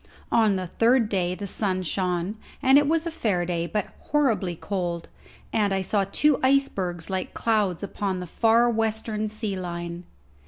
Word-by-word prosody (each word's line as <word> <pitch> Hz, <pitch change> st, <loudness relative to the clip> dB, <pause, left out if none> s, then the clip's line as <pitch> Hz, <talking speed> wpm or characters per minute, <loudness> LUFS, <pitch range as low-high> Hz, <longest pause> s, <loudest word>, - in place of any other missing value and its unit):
On 220 Hz, -3 st, +4 dB
the 185 Hz, -1 st, -2 dB
third 230 Hz, +5 st, +2 dB
day 180 Hz, -3 st, 0 dB
the 200 Hz, -, -6 dB
sun 190 Hz, -1 st, 0 dB
shone, 180 Hz, +2 st, -1 dB, 0.2 s
and 270 Hz, +1 st, +6 dB
it 290 Hz, -, +1 dB
was 325 Hz, +2 st, +1 dB
a 335 Hz, -, -2 dB
fair 205 Hz, -, 0 dB
day, 170 Hz, -1 st, -1 dB
but 210 Hz, 0 st, -1 dB
horribly 230 Hz, -, +1 dB
cold, 175 Hz, -2 st, -3 dB, 0.4 s
and 210 Hz, -3 st, +2 dB
I 190 Hz, -1 st, 0 dB
saw 195 Hz, +1 st, +1 dB
two 300 Hz, -3 st, +3 dB
icebergs 195 Hz, -11 st, +1 dB
like 190 Hz, -1 st, -3 dB
clouds 210 Hz, -6 st, +1 dB
upon 195 Hz, -1 st, -2 dB
the 180 Hz, -, -5 dB
far 230 Hz, +6 st, +3 dB
western 220 Hz, -1 st, -1 dB
sea 215 Hz, -2 st, -3 dB
line. 175 Hz, -1 st, -5 dB
200 Hz, 165 wpm, -25 LUFS, 180-225 Hz, 0.4 s, and